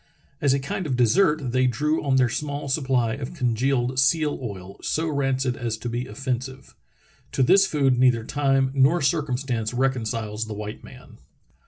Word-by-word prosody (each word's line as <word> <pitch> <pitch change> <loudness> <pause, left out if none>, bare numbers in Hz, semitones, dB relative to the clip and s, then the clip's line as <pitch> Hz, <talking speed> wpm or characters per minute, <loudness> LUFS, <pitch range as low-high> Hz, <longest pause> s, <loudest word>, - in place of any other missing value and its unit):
As 140 - +3
a - - 0
kind 145 +6 -4
of 130 - -1
dessert 140 - +2
they 130 +1 +2
drew 150 +6 0
on 135 -2 +1
their 130 -1 +4
small 145 +4 -4
supply 130 -5 +1
of 140 +6 -6
congealed 125 -1 0
seal 150 +2 +2
oil, 100 -5 -7
so 160 +1 -1
rancid 135 -3 0
as 115 -2 -3
to 120 - -5
be 120 +2 -3
offensive. 130 0 -5 0.6
To 135 - +2
this 195 +8 +5
food 135 -4 +1
neither 125 -3 +3
time 135 0 +1
nor 140 +4 +3
circumstance 130 -6 -1
reconciles 115 -4 -1
the 110 - -6
white 105 0 -7
man. - - -14
130 Hz, 165 wpm, -24 LUFS, 120-140 Hz, 0.6 s, this